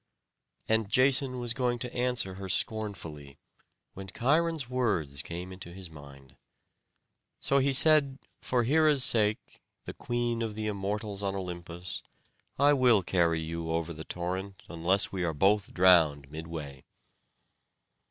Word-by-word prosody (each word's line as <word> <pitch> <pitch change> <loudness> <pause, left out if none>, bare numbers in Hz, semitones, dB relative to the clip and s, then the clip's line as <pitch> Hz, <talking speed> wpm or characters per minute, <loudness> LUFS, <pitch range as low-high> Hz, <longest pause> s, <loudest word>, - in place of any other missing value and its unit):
And 110 -2 +1
Jason 130 +2 +2
was 120 -1 -2
going 125 -2 -1
to 120 +1 -6
answer 125 -6 0
her 95 0 -8
scornfully, 85 -11 -3 0.6
when 95 0 -9
Cheiron's 150 - 0
words 95 - -1
came 90 +4 -7
to 85 - -9
his 90 -2 -10
mind. 70 -3 -14 1.0
So 140 - +1
he 135 +1 +1
said: 140 -1 +6 0.2
"For 125 -1 0
Hera's 150 +1 +3
sake, 105 -3 0 0.2
the - - -7
Queen 120 -1 -2
of 110 -2 -3
the 110 0 -4
Immortals 105 0 -3
on 100 -1 -2
Olympus, 90 -2 -6 0.6
I 145 +1 +5
will 125 -7 +4
carry 85 -2 +1
you 80 +1 -5
over 85 0 -2
the 80 0 -8
torrent, 95 +3 -5
unless 90 +4 +1
we 95 -2 -3
both 100 +6 +2
are - - -17
drowned 80 -7 +4
midway." 80 -4 -8
100 Hz, 135 wpm, -29 LUFS, 85-120 Hz, 1.0 s, said